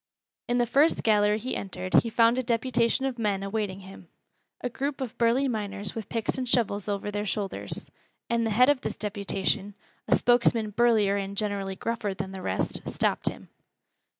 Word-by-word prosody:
In 240 - +1
the 240 - +3
first 280 +7 +3
gallery 210 -1 +4
he 255 +4 -3
entered 185 -1 -5
he 230 - -4
found 230 +2 +4
a - - +2
deputation 240 +1 +1
of 255 -3 -3
men 200 -3 0
awaiting 195 -1 -3
him, 190 +1 -12 0.5
a - - -2
group 275 +3 -3
of 255 -4 -4
burly 240 +4 +3
miners 205 -4 -3
with 225 -3 -6
picks 230 +3 -2
and 255 -2 -3
shovels 210 -5 +1
over 205 0 -2
their 205 +1 -2
shoulders, 200 -1 -4 0.4
and 235 0 +1
the 225 - 0
head 245 +4 +5
of 290 -3 +2
this - - -4
deputation, 200 -1 -2 0.3
a - - +5
spokesman 235 -3 +3
burlier 215 -3 +3
and 200 0 -4
generally 200 -2 -1
gruffer 215 -1 -3
than 190 +1 -5
the 190 -1 -7
rest, - - -2
stopped - - 0
him. - - -11
215 Hz, 180 wpm, -27 LUFS, 200-240 Hz, 0.5 s, head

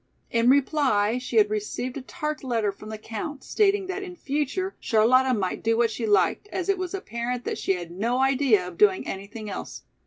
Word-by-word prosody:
In 230 +1 +3
reply 260 -5 +3
she 250 -1 -6
had 210 -1 +5
received 215 +4 -3
a 280 - -4
tart 300 +2 -4
letter 230 -5 0
from 215 +2 -12
the 220 - -5
Count 230 +7 -6
stating 405 -2 +2
that 380 +1 -4
in 365 -2 -7
future 300 +6 -2
Charlotta 255 +4 +4
might 195 -6 -1
do 225 0 +1
what 235 -1 +3
she 225 0 -3
liked, 210 - +2
as 375 -2 -4
it 390 -1 +2
was 370 +1 -3
apparent 245 - -4
that - - -3
she 195 - +1
had 175 -2 -6
no 225 +8 -1
idea 260 -8 +3
of 175 -2 -10
doing 200 -3 +4
anything 205 +3 -6
else. 200 - -6
245 Hz, 205 wpm, -25 LUFS, 215-295 Hz, -, had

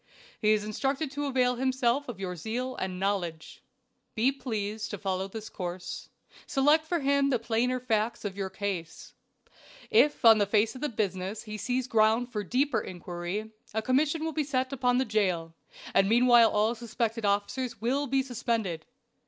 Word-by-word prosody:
"He 215 -1 +4
is 215 -1 +2
instructed 270 +7 -1
to 290 0 -3
avail 250 -2 +2
himself 260 +1 +1
of 220 -6 -6
your 185 -2 -4
zeal 245 +8 -3
and 185 -1 -3
knowledge. 185 -5 -2 0.5
"Be 245 +4 +3
pleased 220 -5 -4
to 205 - -4
follow 190 0 -2
this 220 +2 -7
course. 180 -1 -6 0.4
Select 295 +3 +3
for 340 -1 0
him 280 0 +2
the 255 - +2
plainer 235 +2 0
facts 230 -2 -1
of 195 -2 -3
your 195 -1 -3
case. 190 -4 -5 0.8
If 300 - +4
on 225 -1 +9
the 205 - +2
face 215 +2 +2
of 255 - -10
the 300 - 0
business 200 -2 -3
he 215 -1 -7
sees 245 +5 -1
ground 225 +2 +3
for 210 -3 -2
deeper 265 +9 +1
inquiry, 180 +4 -5 0.2
a 220 - 0
commission 295 +6 +1
will 320 - -2
sit 260 -1 -1
upon 250 -2 +2
the 260 - +2
jail, 185 -7 0 0.4
and 195 0 +4
meanwhile 240 0 +6
all 215 +2 +2
suspected 230 -1 -3
officers 205 +5 -1
will 270 +5 0
be 270 +1 +1
suspended. 225 -9 -2
225 Hz, 170 wpm, -29 LUFS, 200-255 Hz, 0.8 s, on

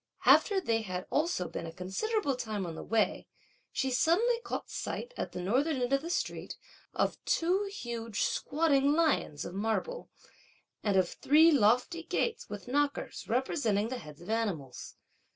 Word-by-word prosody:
After 400 -3 +6
they 230 -10 0
had 185 -3 -4
also 300 - +1
been 165 - -5
a - - -6
considerable 275 - -1
time 215 -5 -3
on 170 - -5
the - - -7
way, 225 0 0 0.4
she 265 - -1
suddenly 420 - +3
caught - - -4
sight, - - -5
at - - -4
the - - -6
northern 260 - +1
end 250 +2 0
of 275 - +3
the 335 - -6
street, - - -3 0.4
of - - 0
two 365 +5 +1
huge 230 - -3
squatting 285 -2 +2
lions 310 - +1
of - - -6
marble 225 - -2 0.7
and 200 -3 +2
of 185 -2 +4
three 315 - +5
lofty 250 +6 +3
gates 455 +7 -2
with - - -7
(knockers 285 +2 -1
representing) 230 -4 0
the 255 0 -4
heads 150 -3 -12
of 175 - -6
animals. 185 - -3
250 Hz, 160 wpm, -31 LUFS, 205-325 Hz, 0.7 s, After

